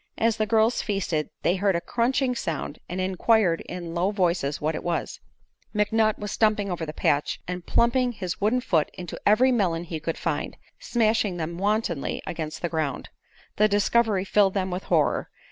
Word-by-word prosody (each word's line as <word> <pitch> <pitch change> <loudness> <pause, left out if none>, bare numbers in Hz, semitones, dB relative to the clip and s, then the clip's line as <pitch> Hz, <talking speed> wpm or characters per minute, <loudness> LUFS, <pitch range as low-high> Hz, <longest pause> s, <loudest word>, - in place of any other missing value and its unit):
As 225 0 +2
the 215 - 0
girls 220 +2 +3
feasted 185 -7 -1
they 180 - +2
heard 195 -1 +2
a - - +2
crunching 250 +6 0
sound 160 -9 -4
and 180 - -4
inquired 185 -1 +2
in 175 -2 -6
low 175 +3 +1
voices 175 -8 0
what 155 +2 -1
it - - -5
was. 175 -1 -2 0.6
McNutt 215 +1 +2
was 210 0 -5
stumping 210 -3 +1
over 165 -2 -3
the - - -3
patch 145 -1 0
and 180 -1 -5
plumping 245 +1 +2
his 185 -5 -5
wooden 225 +5 +2
foot 165 -10 +1
into 180 -3 -7
every 240 +6 +5
melon 180 -8 +1
he 165 -2 -5
could 165 +1 -3
find, - - -3 0.2
smashing 220 - +1
them 170 +1 -4
wantonly 200 -7 0
against 160 -1 -5
the 170 - 0
ground. 155 -5 -2 0.5
The 215 - +5
discovery 205 -1 +2
filled 200 -1 +3
them 190 -1 -1
with 180 +2 -4
horror. - - +1
195 Hz, 180 wpm, -25 LUFS, 170-220 Hz, 0.6 s, every